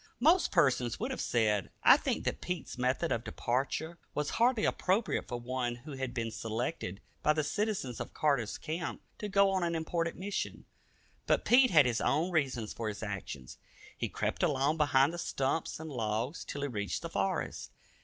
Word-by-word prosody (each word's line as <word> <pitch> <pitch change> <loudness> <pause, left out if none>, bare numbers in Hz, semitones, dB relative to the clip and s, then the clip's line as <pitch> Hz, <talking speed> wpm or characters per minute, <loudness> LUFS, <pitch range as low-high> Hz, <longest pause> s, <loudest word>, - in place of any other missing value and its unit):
Most 330 +8 +4
persons 130 - +2
would 245 +5 -2
have 260 - -3
said, 105 -5 +1
I - - +9
think, - - -1
that - - -2
Pete's 180 -3 -4
method 130 +6 0
of 115 - 0
departure 140 +9 -2 0.2
was 150 -1 -1
hardly 240 -2 +4
appropriate 200 +5 +1
for 120 - -4
one 120 0 -2
who 140 +6 -11
had 130 -2 -3
been 115 -2 -2
selected 110 - -3 0.2
by 150 - +4
the 155 0 0
citizens 190 - -2
of - - -5
Carter's 140 -8 +1
Camp 160 +2 -4 0.2
to 210 - -4
go 200 0 +4
on 190 -1 +1
an 170 -1 0
important 165 +1 -1
mission. 200 +2 -4 0.6
But - - +2
Pete 255 +1 +6
had 155 - +6
his 120 -2 +1
own 160 +6 +1
reasons 130 -9 0
for 115 - -4
his 105 0 -4
actions. 95 - -6 0.4
He - - -2
crept - - -2
along 140 +4 +2
behind 145 0 +4
the 175 - -5
stumps 140 +1 -1
and 160 -1 -7
logs 115 +4 -2
till 145 - -5
he - - 0
reached 105 -6 -3
the - - -4
forest. - - -2
145 Hz, 185 wpm, -32 LUFS, 120-170 Hz, 0.6 s, I